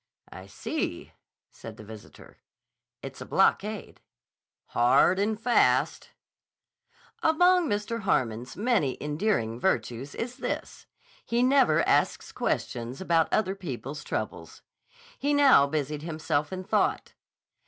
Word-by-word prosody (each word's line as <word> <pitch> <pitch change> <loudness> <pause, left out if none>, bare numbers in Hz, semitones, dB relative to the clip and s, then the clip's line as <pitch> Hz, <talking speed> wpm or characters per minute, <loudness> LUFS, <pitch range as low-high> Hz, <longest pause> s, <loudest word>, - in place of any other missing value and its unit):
"I 95 +1 -11
see," - - -4 0.4
said 110 -1 -11
the - - -11
visitor. 110 0 -13 0.6
"It's - - -8
a - - -6
blockade." 210 +1 0 0.7
"Hard 150 +10 +3
and 210 +1 0
fast." 240 +1 +2 1.1
Among 355 +2 +4
Mr. 210 +2 -2
Harmon's 125 - -1
many 210 - +1
endearing 150 - -1
virtues 125 -4 -2
is 245 +2 -5
this: - - -5 0.4
he 235 +1 0
never 255 - +3
asks - - +1
questions 120 +2 -3
about 170 -3 +1
other 190 -3 +1
people's 150 -6 -7
troubles. - - -5 0.6
He 290 +1 +1
now 275 - +6
busied 150 0 -3
himself 155 -2 -2
in 185 0 -5
thought. - - 0
170 Hz, 110 wpm, -27 LUFS, -, 1.1 s, now